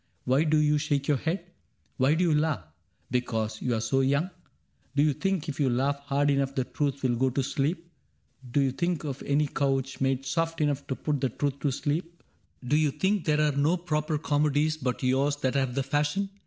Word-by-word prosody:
Why 135 +5 +3
do 155 0 +3
you 150 0 +3
shake 145 -2 0
youf 140 -2 +1
head? 170 +2 -2 0.5
Why 135 +4 +3
do 175 - +2
you 170 -3 +3
laugh? 150 - +1 0.3
— - - -37
because 110 -3 -1
you 125 -2 0
are - - 0
so 115 +4 +1
young? 140 +7 +1 0.6
Do 145 - +4
you 150 -1 +3
think 195 +1 -1
if 150 - -5
you 140 -3 +3
laugh 135 +3 +1
hard 140 0 +1
enough 140 -1 0
the 130 - +1
truth 140 +1 -2
Will 125 -2 +2
go 130 +2 +2
to 130 +2 -1
sleep? 160 +6 -1 0.6
Do 140 - +3
you 135 -1 +2
think 170 +3 -1
of 140 -3 -4
any 145 +2 +1
couch 135 -2 -1
Made 135 0 +1
soft 165 +4 -1
enough 145 -2 0
to 130 - -2
put 145 -1 -2
the 130 - +1
truth 140 +3 -2
to 145 - 0
sleep 155 +6 -2 0.5
f 125 - -7
Do 150 - +4
you 155 -1 +3
think 190 +6 0
there 150 -1 +2
are 150 -2 +2
no 150 +5 +2
proper 155 -3 -1
comedies 150 0 +1
But 130 -4 -3
yours 135 +3 +2
that 130 -3 -1
have 130 -3 0
the 135 - +1
fashion 150 +9 0
145 Hz, 220 wpm, -28 LUFS, 135-155 Hz, 0.6 s, Do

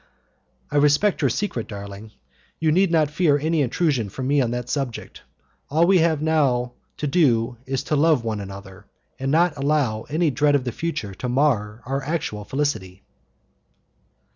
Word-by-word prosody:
"I 145 - 0
respect 150 +8 +3
your 135 - +3
secret, 125 - -2
darling; 100 0 -8 0.5
you 160 -1 +2
need 185 +4 +3
not 155 -3 +2
fear 150 -3 +3
any 160 +2 0
intrusion 135 - 0
from 130 +6 -5
me 140 +1 +2
on 120 - 0
that 120 0 -3
subject. 130 -3 -4 0.5
All 160 +4 +3
we 190 0 +5
have 160 -2 +2
to 135 -2 -1
do 125 -7 +2
is 135 0 -2
to 150 - -1
love 150 -4 +3
one 110 -2 -2
another, 95 -1 -10 0.3
and 135 +1 -2
not 170 +2 +3
to 145 - -12
allow 140 -7 0
any 155 +1 +1
dread 145 +3 +2
of 140 - +1
the 125 - -3
future 115 -8 -4
to 125 +6 -5
mar 120 -5 0
our 135 +2 -2
actual 135 -8 -3
felicity." 100 -8 -3
140 Hz, 165 wpm, -23 LUFS, 115-155 Hz, 0.5 s, we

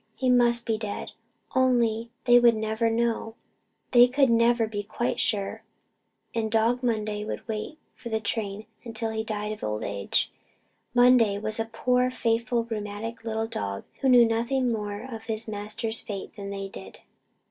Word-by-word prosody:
He 255 -1 +1
must 240 -1 +3
be 220 -1 0
dead. 210 -2 -5 0.4
Only 235 -3 +2 0.2
they 245 -1 +7
would 240 -1 +5
never 220 +1 0
know 225 -1 -1 0.6
they 245 0 +8
could 265 0 +3
never 230 0 +4
be 210 -2 -4
quite 235 +4 -2
sure; 200 -2 0 0.7
and 225 -1 -1
Dog 225 +3 +2
Monday 215 -3 -1
would 215 - -6
wait 220 +7 -4 0.2
for 240 - -9
the 220 -1 0
train 210 -1 -3 0.2
until 225 -1 -2
he 220 0 -2
died 210 -1 -3
of 215 - -7
old 105 0 -2
age. 100 -1 -1 0.6
Monday 245 -4 +5
was 215 +1 -2
only 225 0 -2
a 225 - -15
poor, 250 +1 +2
faithful, 235 -1 0
rheumatic 220 0 -5
little 220 -1 -1
dog, 100 - -4 0.2
who 270 - +2
knew 245 -2 +8
nothing 235 +3 0
more 210 -1 -3
of 230 -4 -8
his 225 0 -2
master's 215 +2 -3
fate 200 -2 -7
than 200 -1 -6
they 195 0 -4
did. 95 - -11
225 Hz, 170 wpm, -26 LUFS, 215-240 Hz, 0.7 s, they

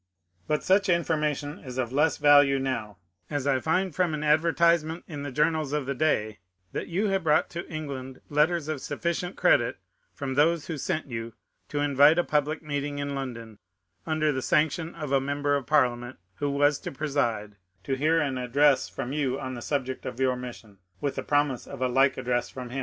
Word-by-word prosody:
But 150 0 0
such 195 +1 +3
information 155 -3 0
is 130 -3 -9
of 125 -3 -1
the - - -6
less 150 +1 +3
value 145 -2 +6
now, 130 -7 -3 0.3
as 145 -3 -2
I 135 -2 +2
find 185 +5 0
from 175 -3 +1
an 150 - -4
adver 155 +2 +3
tisement 170 -1 +2
in 150 -4 -6
the 145 -1 -5
journals 150 +1 +1
of 150 -2 -1
the 140 - -2
day 110 -7 0 0.3
that - - -4
you 195 +5 0
have 195 -2 0
brought 155 -1 +2
to 170 - -6
England 135 -4 -6
letters 150 +2 +1
of 155 -4 -3
sufficient 175 +2 -3
credit - - +3 0.4
from 135 -2 -3
those 155 +3 +2
who 165 - -4
sent 155 +4 -2
you 115 -3 -6 0.4
to 145 - -1
invite 145 +2 +5
a 175 - +3
public 150 +1 0
meeting 145 -1 -3
in 140 0 -3
London, 115 -6 -6 0.5
under 155 -1 +1
the 130 -2 -2
sanction 160 +4 +1
of 150 -4 -5
a 135 -1 +3
Member 145 +1 0
of 135 -4 -3
Parliament 125 -4 +1 0.2
who 145 - -1
was 145 +1 +2
to - - -6
preside, 120 -8 -2 0.3
to 135 - -2
hear 155 +5 +2
an 135 -4 -1
ad 125 -1 -6
dress 145 -1 +4
from 135 0 -5
you 135 -3 -1
on 130 0 -5
the 120 - -6
subject 130 -2 -3
of 125 -1 -6
your 130 -1 +2
mission, 120 -5 -9 0.2
with 140 -2 -1
the - - -3
promise 145 -3 0
of - - -8
a 130 - +1
like 135 +2 +3
address 120 0 -1
from 125 -2 -8
him. 135 - -3
145 Hz, 205 wpm, -27 LUFS, 130-155 Hz, 0.5 s, value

